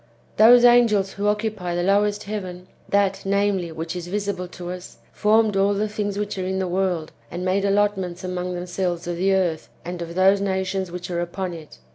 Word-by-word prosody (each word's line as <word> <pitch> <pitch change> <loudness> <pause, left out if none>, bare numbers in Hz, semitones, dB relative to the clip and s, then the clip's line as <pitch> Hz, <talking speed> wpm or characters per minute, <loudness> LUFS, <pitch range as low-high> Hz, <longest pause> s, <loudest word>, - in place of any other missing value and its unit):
Those 240 +3 +8
angels 225 -5 +5
who 205 +1 -2
occupy 210 -4 -1
the 175 - 0
lowest 205 +2 +2
heaven, 185 -3 -6 0.2
that, 195 -1 +1
namely, 195 -3 0
which 160 +2 -5
is 175 -1 -5
visible 200 -1 -3
to 175 0 -7
us, 180 0 -9 0.2
formed 215 0 +3
all 200 +1 +2
the 210 +2 0
things 205 -1 -3
which 205 -1 -3
are - - -1
in 190 +1 -2
the 190 -1 -1
world, 180 -3 -1 0.2
and 180 +1 -5
made 195 +2 +1
allotments 195 -3 0
among 180 0 -3
themselves 175 -1 -3
of 175 0 -3
the 190 +2 +2
earth 175 -4 -1 0.2
and 175 0 -5
of 170 0 -6
those 195 +2 +4
nations 190 -1 -1
which 180 +1 -6
are 170 0 -1
upon 175 +1 -4
it. 160 -2 -11
190 Hz, 195 wpm, -23 LUFS, 180-205 Hz, 0.2 s, Those